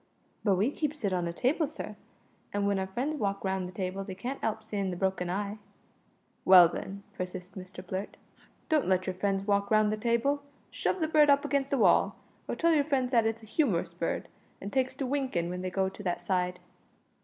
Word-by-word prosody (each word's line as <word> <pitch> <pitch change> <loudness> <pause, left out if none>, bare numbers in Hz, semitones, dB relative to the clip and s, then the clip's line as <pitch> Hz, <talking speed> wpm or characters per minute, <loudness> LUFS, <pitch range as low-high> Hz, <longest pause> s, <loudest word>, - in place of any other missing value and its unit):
"But 200 -3 +4
we 210 +9 +2
keeps 300 -2 -3
it 200 -2 +1
on 175 -2 0
a - - -2
table, 270 - +1
sir, - - -7 0.6
an' 205 - -1
w'en 200 -1 +1
our 190 - -2
friends 260 +10 -2
walk 200 -4 -1
round 190 -1 -1
the - - -8
table 190 +1 -3
they 190 -1 -7
can't 250 +8 -5
'elp 220 0 -1
seein' 205 -3 -2
the 180 - -4
broken 190 -1 0
eye." 200 +3 -2 0.8
"Well, 180 -2 +9
then," 200 +3 -6
persisted 185 0 -6
Mr 185 0 -11
Blurt, 190 +2 -4 0.5
"don't 310 -3 +2
let 185 0 +2
your 185 - -1
friends 195 +1 -1
walk 200 -1 +1
round 215 -1 +4
the - - -2
table. 235 +6 +1 0.3
Shove 370 - -1
the 315 - +2
bird 305 -2 +5
up 280 0 +5
against 275 -1 0
the 280 - +1
wall; - - +4 0.3
or - - -2
tell 335 0 +3
your 295 -2 +4
friends 265 -4 0
that 230 -3 +4
it's 225 0 -3
a - - -10
humorous 215 - 0
bird, - - -2 0.3
an' 200 - -6
takes 260 -1 0
to 275 - -2
winking 255 -11 -1
when 180 0 -4
they 185 - -2
go 190 +1 +1
to 190 +2 -8
that 180 -3 -2
side." 180 -1 0
200 Hz, 215 wpm, -30 LUFS, 185-260 Hz, 0.8 s, Well